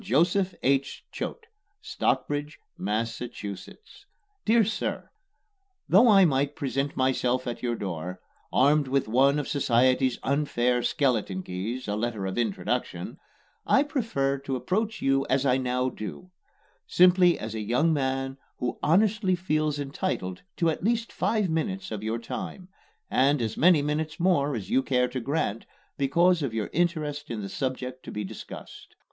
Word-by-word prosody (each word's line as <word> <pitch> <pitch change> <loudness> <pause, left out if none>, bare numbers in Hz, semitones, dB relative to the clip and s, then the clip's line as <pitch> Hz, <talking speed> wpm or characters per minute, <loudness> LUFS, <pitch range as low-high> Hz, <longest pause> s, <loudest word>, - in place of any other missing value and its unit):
JOSEPH 180 - +2
H. 135 +1 0
CHOATE, 460 - -5 0.3
Stockbridge, 145 - -1 0.2
Massachusetts. 110 - -5 0.4
DEAR 225 +1 +5
SIR: 220 - -3 0.8
Though 210 +7 +6
I 195 -4 +7
might 140 -1 +1
present 135 +1 -2
myself 130 -1 +1
at 120 - -4
your 120 -1 -1
door, 90 -3 -5 0.3
armed 145 +2 +4
with 135 -1 +1
one 135 +5 +4
of 145 - -2
society's 130 -1 +2
unfair 125 -4 +1
skeleton 110 -9 0
keys 105 +9 -4
a 105 - -1
letter 110 -2 -2
of 95 +5 -2
introduction 120 - -2 0.5
I 275 - +5
prefer 215 - -1
to 135 -1 -3
approach 215 - -2
you 135 0 +3
as 135 +1 +2
I 130 -1 +3
now 125 0 0
do: 180 - -8 0.6
simply 180 -1 +5
as 110 0 -6
a 110 - -3
young 125 +10 +2
man 135 -1 -1 0.2
who 125 - -3
honestly 195 +2 +3
feels 155 -4 0
entitled 140 - -3 0.2
to 165 -2 +2
at 160 - -6
least 230 +2 0
five 215 -3 +1
minutes 185 - -2
of 105 -2 -4
your 110 +2 -2
time, 185 +10 -6 0.4
and 140 +2 +3
as 110 -2 -2
many 165 -3 +5
minutes 155 +2 -2
more 150 -6 +2
as 105 -5 -6
you 130 - +4
care 125 -2 +1
to 130 - -3
grant 120 -4 -2 0.3
because 170 +5 +3
of 130 -6 -2
your 110 -2 -2
interest 155 -4 -1
in 110 -3 -4
the - - -4
subject 130 0 -4
to - - -7
be 105 - -3
discussed. 95 - -10
135 Hz, 150 wpm, -27 LUFS, 120-170 Hz, 0.8 s, I